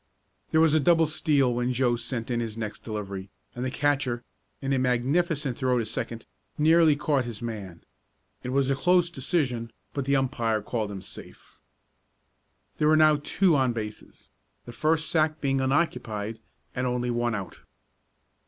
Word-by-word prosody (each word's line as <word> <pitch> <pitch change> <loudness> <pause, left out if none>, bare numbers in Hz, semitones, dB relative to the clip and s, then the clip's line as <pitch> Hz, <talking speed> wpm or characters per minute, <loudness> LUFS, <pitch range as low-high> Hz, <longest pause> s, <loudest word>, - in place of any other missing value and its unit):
There 160 - +3
was 160 -2 +4
a 155 - +5
double 165 +2 +4
steal 145 -4 +2
when 125 +1 0
Joe 125 -1 +2
sent 120 0 -4
in 120 - 0
his 115 -2 -4
next 110 -2 -5
delivery, 100 -3 -5 0.2
and 125 - -5
the 130 - -1
catcher, 135 -3 0 0.4
in 135 0 -1
a 135 - +2
magnificent 135 +3 0
throw 130 -1 +2
to 115 - 0
second, 115 +1 -4 0.3
nearly 160 0 +5
caught 145 -3 0
his 120 -2 -7
man. 100 -7 -6 0.6
It 125 - -5
was 135 +1 +1
a - - +2
close 175 +3 +3
decision, 125 -6 -1 0.2
but 140 -2 -2
the 140 +1 +2
umpire 120 -5 0
called 110 -1 -2
him 95 -2 -7
safe. - - -11 1.2
There 150 - +3
were 155 0 +5
now 155 -1 +5
two 185 -1 +3
on 130 -3 +2
bases, 110 -2 -7 0.3
the 120 - -8
first 160 +5 0
sack 155 -1 +1
being 135 -1 0
unoccupied, 120 -7 -1 0.3
and 125 0 -1
only 125 0 -1
one 120 -1 0
out. 100 -3 -6
130 Hz, 165 wpm, -27 LUFS, 115-150 Hz, 1.2 s, a